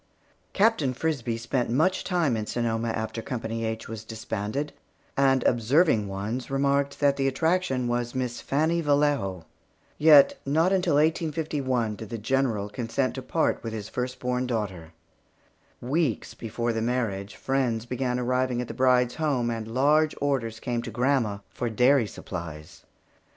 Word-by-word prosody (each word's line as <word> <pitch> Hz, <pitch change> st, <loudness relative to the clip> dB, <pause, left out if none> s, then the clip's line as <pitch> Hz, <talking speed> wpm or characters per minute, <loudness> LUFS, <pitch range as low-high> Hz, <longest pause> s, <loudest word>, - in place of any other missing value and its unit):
Captain 195 Hz, -, +2 dB
Frisbie 125 Hz, -6 st, -1 dB
spent 120 Hz, +2 st, -1 dB
much 160 Hz, +10 st, +2 dB
time 170 Hz, -9 st, +1 dB
in 110 Hz, -1 st, -3 dB
Sonoma 115 Hz, -1 st, -1 dB
after 110 Hz, 0 st, -3 dB
Company 115 Hz, -1 st, -4 dB
H 110 Hz, 0 st, -4 dB
was 110 Hz, -1 st, -7 dB
disbanded, 110 Hz, +4 st, -4 dB, 0.4 s
and 135 Hz, -2 st, +3 dB
observing 120 Hz, -, +3 dB
ones 105 Hz, +6 st, -4 dB
remarked 140 Hz, +1 st, +1 dB
that 140 Hz, -1 st, +3 dB
the 135 Hz, -1 st, +1 dB
attraction 135 Hz, -2 st, +1 dB
was 120 Hz, +1 st, -2 dB
Miss 125 Hz, -2 st, -2 dB
Fannie 160 Hz, +4 st, +1 dB
Vallejo. 145 Hz, -, +1 dB, 0.5 s
Yet, 150 Hz, -2 st, +7 dB
not 160 Hz, +7 st, +2 dB
until 180 Hz, -5 st, +2 dB
1851 150 Hz, -7 st, 0 dB
did 110 Hz, -, -8 dB
the 115 Hz, -, -4 dB
General 110 Hz, -2 st, 0 dB
consent 120 Hz, +4 st, -2 dB
to 130 Hz, -, -5 dB
part 160 Hz, +5 st, 0 dB
with 115 Hz, -1 st, -5 dB
his 110 Hz, -1 st, -5 dB
first 125 Hz, 0 st, -3 dB
born 125 Hz, 0 st, -1 dB
daughter. 95 Hz, -9 st, -3 dB, 0.9 s
Weeks 135 Hz, -1 st, -1 dB
before 115 Hz, +1 st, -3 dB
the 115 Hz, -, -1 dB
marriage 110 Hz, -5 st, -2 dB
day, -, -, -15 dB
friends 125 Hz, -4 st, 0 dB
began 125 Hz, 0 st, -1 dB
arriving 125 Hz, 0 st, 0 dB
at 125 Hz, -, -3 dB
the -, -, -6 dB
bride's 125 Hz, -1 st, +3 dB
home, 135 Hz, -7 st, 0 dB
and 115 Hz, -1 st, -4 dB
large 150 Hz, +5 st, +3 dB
orders 120 Hz, -6 st, -1 dB
came 120 Hz, 0 st, -2 dB
to 120 Hz, -, -6 dB
grandma 120 Hz, -3 st, +1 dB
for 120 Hz, -, -3 dB
dairy 125 Hz, +1 st, +4 dB
supplies. 80 Hz, -6 st, -8 dB
125 Hz, 150 wpm, -26 LUFS, 115-140 Hz, 0.9 s, Yet